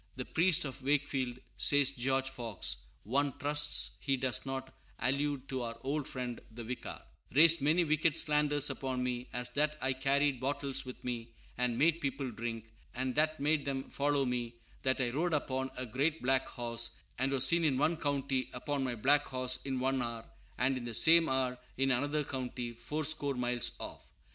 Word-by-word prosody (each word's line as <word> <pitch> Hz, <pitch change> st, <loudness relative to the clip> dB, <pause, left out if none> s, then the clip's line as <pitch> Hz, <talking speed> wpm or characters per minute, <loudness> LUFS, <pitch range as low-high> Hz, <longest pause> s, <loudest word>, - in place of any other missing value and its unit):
"The 125 Hz, -, -5 dB
Priest 170 Hz, 0 st, +3 dB
of 135 Hz, 0 st, -6 dB
Wakefield," 135 Hz, -3 st, 0 dB, 0.2 s
says 145 Hz, -1 st, +4 dB
George 135 Hz, +1 st, 0 dB
Fox 115 Hz, -7 st, -2 dB, 0.3 s
(one 135 Hz, +5 st, 0 dB
trusts 150 Hz, +1 st, +2 dB
he 135 Hz, -1 st, 0 dB
does 130 Hz, -3 st, 0 dB
not 130 Hz, 0 st, -5 dB, 0.2 s
allude 140 Hz, 0 st, 0 dB
to 130 Hz, -1 st, -2 dB
our 115 Hz, -1 st, -4 dB
old 140 Hz, +1 st, -2 dB
friend 125 Hz, -2 st, -5 dB
the 115 Hz, +1 st, -8 dB
Vicar), 125 Hz, +2 st, -5 dB, 0.4 s
"raised 165 Hz, +1 st, +8 dB
many 160 Hz, +5 st, +3 dB
wicked 155 Hz, 0 st, +2 dB
slanders 150 Hz, -2 st, +2 dB
upon 130 Hz, -2 st, -3 dB
me, 125 Hz, 0 st, -3 dB
as 125 Hz, 0 st, -2 dB
that 150 Hz, +4 st, 0 dB
I 130 Hz, 0 st, +1 dB
carried 135 Hz, 0 st, +1 dB
bottles 135 Hz, 0 st, -1 dB
with 125 Hz, -, -9 dB
me 115 Hz, -2 st, -5 dB, 0.2 s
and 125 Hz, -1 st, 0 dB
made 165 Hz, +4 st, +3 dB
people 135 Hz, -2 st, -2 dB
drink, 115 Hz, 0 st, -5 dB, 0.3 s
and 130 Hz, +1 st, -1 dB
that 155 Hz, +1 st, +2 dB
made 150 Hz, +1 st, +1 dB
them 135 Hz, -1 st, -2 dB
follow 140 Hz, -1 st, +1 dB
me; 120 Hz, -2 st, -2 dB, 0.3 s
that 130 Hz, 0 st, +1 dB
I 125 Hz, -2 st, +1 dB
rode 165 Hz, +6 st, 0 dB
upon 130 Hz, -2 st, -2 dB
a 130 Hz, -, -2 dB
great 140 Hz, +7 st, -1 dB
black 130 Hz, +1 st, +2 dB
horse, 115 Hz, -1 st, -1 dB, 0.2 s
and 130 Hz, +1 st, +2 dB
was 135 Hz, -1 st, +5 dB
seen 170 Hz, +4 st, +4 dB
in 145 Hz, -5 st, +2 dB
one 155 Hz, +5 st, +2 dB
county 140 Hz, -3 st, -1 dB
upon 140 Hz, +2 st, -2 dB
my 125 Hz, -2 st, -1 dB
black 145 Hz, +6 st, +3 dB
horse 130 Hz, 0 st, -1 dB
in 135 Hz, -2 st, -2 dB
one 130 Hz, 0 st, 0 dB
hour, 115 Hz, -1 st, -4 dB, 0.3 s
and 130 Hz, +2 st, +1 dB
in 120 Hz, -, -6 dB
the 120 Hz, -2 st, -3 dB
same 165 Hz, +4 st, +6 dB
hour 130 Hz, -1 st, 0 dB, 0.2 s
in 135 Hz, +1 st, +2 dB
another 145 Hz, +4 st, +1 dB
county 125 Hz, -3 st, -4 dB
fourscore 145 Hz, +4 st, -1 dB
miles 125 Hz, -1 st, 0 dB
off." -, -, -7 dB
135 Hz, 180 wpm, -32 LUFS, 125-145 Hz, 0.4 s, raised